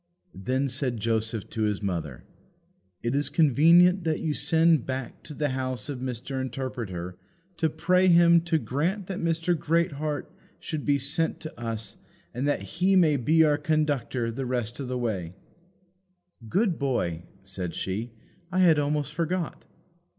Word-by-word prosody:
Then 130 Hz, +8 st, -1 dB
said 125 Hz, -2 st, -2 dB
Joseph 110 Hz, -1 st, -1 dB
to 110 Hz, -, -3 dB
his 105 Hz, -1 st, 0 dB
mother, 80 Hz, -9 st, -3 dB, 0.8 s
"It 120 Hz, +1 st, 0 dB
is 145 Hz, 0 st, +1 dB
convenient 170 Hz, +5 st, +5 dB
that 160 Hz, -2 st, 0 dB
you 155 Hz, -2 st, -1 dB
send 160 Hz, -3 st, +3 dB
back 130 Hz, -1 st, -5 dB
to 150 Hz, -, -9 dB
the 150 Hz, 0 st, 0 dB
house 130 Hz, 0 st, -3 dB
of 135 Hz, -3 st, -4 dB
Mr. 130 Hz, +1 st, -4 dB
Interpreter 120 Hz, -9 st, -5 dB, 0.4 s
to 160 Hz, -, +1 dB
pray 180 Hz, +4 st, +2 dB
him 170 Hz, -1 st, +6 dB
to 170 Hz, -2 st, +2 dB
grant 160 Hz, -, -1 dB
that 190 Hz, 0 st, -5 dB
Mr. 165 Hz, +1 st, +1 dB
Greatheart 150 Hz, -3 st, -1 dB, 0.3 s
should 155 Hz, -3 st, -5 dB
be 145 Hz, -1 st, +4 dB
sent 150 Hz, +5 st, -1 dB
to 155 Hz, -, -7 dB
us 115 Hz, -3 st, -4 dB, 0.4 s
that 140 Hz, +4 st, 0 dB
he 185 Hz, +3 st, +1 dB
may 165 Hz, -5 st, +5 dB
be 155 Hz, +5 st, +4 dB
our 150 Hz, -1 st, +3 dB
conductor 145 Hz, -6 st, 0 dB
the 130 Hz, +2 st, -4 dB
rest 120 Hz, -1 st, -2 dB
of 135 Hz, -3 st, -4 dB
our 125 Hz, -, -2 dB
way." 95 Hz, -8 st, -3 dB, 1.1 s
"Good 195 Hz, -, +1 dB
boy," 105 Hz, -, -1 dB, 0.2 s
said 95 Hz, -3 st, -5 dB
she, 105 Hz, +6 st, -3 dB, 0.4 s
"I 185 Hz, -, -2 dB
had 165 Hz, -4 st, +5 dB
almost 145 Hz, 0 st, -1 dB
forgot." 170 Hz, +2 st, -2 dB
140 Hz, 150 wpm, -27 LUFS, 120-160 Hz, 1.1 s, him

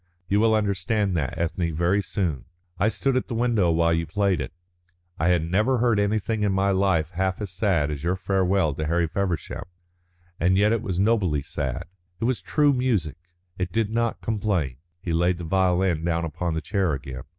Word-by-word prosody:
You 100 Hz, +3 st, +2 dB
will 110 Hz, 0 st, +4 dB
understand 100 Hz, -1 st, 0 dB
that, 75 Hz, -1 st, -2 dB
Ethne, 85 Hz, -1 st, -1 dB
very 90 Hz, +5 st, +2 dB
soon. 85 Hz, -, -2 dB, 0.3 s
I 100 Hz, -, +3 dB
stood 135 Hz, +3 st, 0 dB
at 130 Hz, -, 0 dB
the 120 Hz, -, -4 dB
window 115 Hz, -6 st, +2 dB
while 85 Hz, 0 st, +3 dB
you 85 Hz, 0 st, -1 dB
played 100 Hz, -6 st, +1 dB
it. -, -, -5 dB, 0.7 s
I 80 Hz, -, +1 dB
had 90 Hz, -3 st, +3 dB
never 105 Hz, +10 st, +1 dB
heard 120 Hz, -3 st, +2 dB
anything 105 Hz, +1 st, 0 dB
in 105 Hz, -1 st, +2 dB
my 95 Hz, +1 st, +2 dB
life 95 Hz, -4 st, +1 dB
half 95 Hz, +1 st, -1 dB
so 105 Hz, -, -3 dB
sad 90 Hz, -5 st, 0 dB
as 70 Hz, -1 st, -5 dB
your 90 Hz, +2 st, +1 dB
farewell 95 Hz, -4 st, +1 dB
to 75 Hz, +2 st, -3 dB
Harry 85 Hz, +1 st, +2 dB
Feversham, 90 Hz, +2 st, -3 dB, 0.7 s
and 95 Hz, +3 st, +3 dB
yet 105 Hz, +2 st, +4 dB
it 115 Hz, -, 0 dB
was 95 Hz, -2 st, -3 dB
nobly 95 Hz, -9 st, +2 dB
sad. 70 Hz, +1 st, -3 dB, 0.4 s
It -, -, -4 dB
was 125 Hz, +1 st, +1 dB
true 145 Hz, -2 st, +2 dB
music, 115 Hz, -, 0 dB, 0.4 s
it 90 Hz, -1 st, -2 dB
did 110 Hz, 0 st, 0 dB
not 115 Hz, 0 st, -1 dB
complain." 100 Hz, -, -1 dB, 0.3 s
He 85 Hz, -, -2 dB
laid 85 Hz, +2 st, +2 dB
the 90 Hz, -, -7 dB
violin 90 Hz, -1 st, +1 dB
down 85 Hz, 0 st, 0 dB
upon 80 Hz, +1 st, -3 dB
the 80 Hz, -, -1 dB
chair 90 Hz, +1 st, 0 dB
again. 65 Hz, -2 st, -6 dB
95 Hz, 195 wpm, -25 LUFS, 85-105 Hz, 0.7 s, will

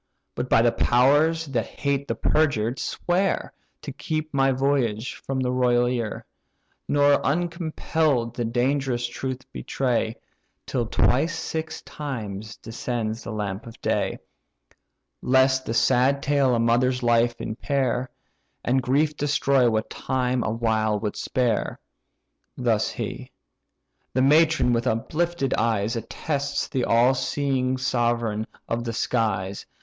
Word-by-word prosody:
But, 125 Hz, -, -4 dB
by 115 Hz, -, +5 dB
the 120 Hz, -, +4 dB
powers 145 Hz, +9 st, +3 dB
that 125 Hz, -6 st, -2 dB
hate 140 Hz, 0 st, -2 dB
the -, -, -1 dB
perjured, 130 Hz, -6 st, +1 dB
swear, 185 Hz, +2 st, -1 dB, 0.3 s
To 145 Hz, -, -5 dB
keep 155 Hz, +2 st, -4 dB
my 135 Hz, -1 st, +3 dB
voyage 130 Hz, -4 st, 0 dB
from 135 Hz, -1 st, -4 dB
the 125 Hz, -1 st, 0 dB
royal 125 Hz, -1 st, +3 dB
ear, 120 Hz, -4 st, -3 dB, 0.6 s
Nor 145 Hz, 0 st, +4 dB
uncompell'd 160 Hz, -5 st, 0 dB
the 120 Hz, -, -2 dB
dangerous 125 Hz, +1 st, 0 dB
truth 130 Hz, +2 st, -4 dB
betray, 120 Hz, -4 st, -1 dB, 0.5 s
Till 120 Hz, -3 st, -1 dB
twice 150 Hz, +8 st, +2 dB
six 160 Hz, 0 st, -4 dB
times 110 Hz, -8 st, -6 dB
descends 115 Hz, -1 st, -4 dB
the -, -, -6 dB
lamp 105 Hz, 0 st, -4 dB
of 115 Hz, -, -12 dB
day, -, -, -1 dB, 1.0 s
Lest 130 Hz, 0 st, +3 dB
the 115 Hz, -, -1 dB
sad 135 Hz, +4 st, +3 dB
tale 140 Hz, -3 st, +3 dB
a -, -, +1 dB
mother's 125 Hz, +2 st, +2 dB
life 120 Hz, 0 st, +2 dB
impair, 130 Hz, +1 st, -1 dB, 0.6 s
And 130 Hz, +2 st, +2 dB
grief 145 Hz, +5 st, +1 dB
destroy 140 Hz, -3 st, +2 dB
what 110 Hz, 0 st, -1 dB
time 125 Hz, -1 st, -1 dB
awhile 110 Hz, -2 st, 0 dB
would 105 Hz, -1 st, -3 dB
spare." 120 Hz, -4 st, -1 dB, 0.8 s
Thus -, -, +1 dB
he. -, -, -5 dB, 0.9 s
The 130 Hz, -, +3 dB
matron 155 Hz, -2 st, +4 dB
with 120 Hz, +2 st, 0 dB
uplifted 150 Hz, +6 st, 0 dB
eyes 110 Hz, 0 st, 0 dB
Attests 140 Hz, +5 st, -2 dB
the 130 Hz, -2 st, -1 dB
all 120 Hz, +3 st, +4 dB
seeing 130 Hz, -1 st, 0 dB
sovereign 120 Hz, -4 st, 0 dB, 0.2 s
of 115 Hz, +1 st, -2 dB
the 115 Hz, -1 st, -3 dB
skies. 100 Hz, -5 st, -1 dB
125 Hz, 125 wpm, -24 LUFS, 115-140 Hz, 1.0 s, by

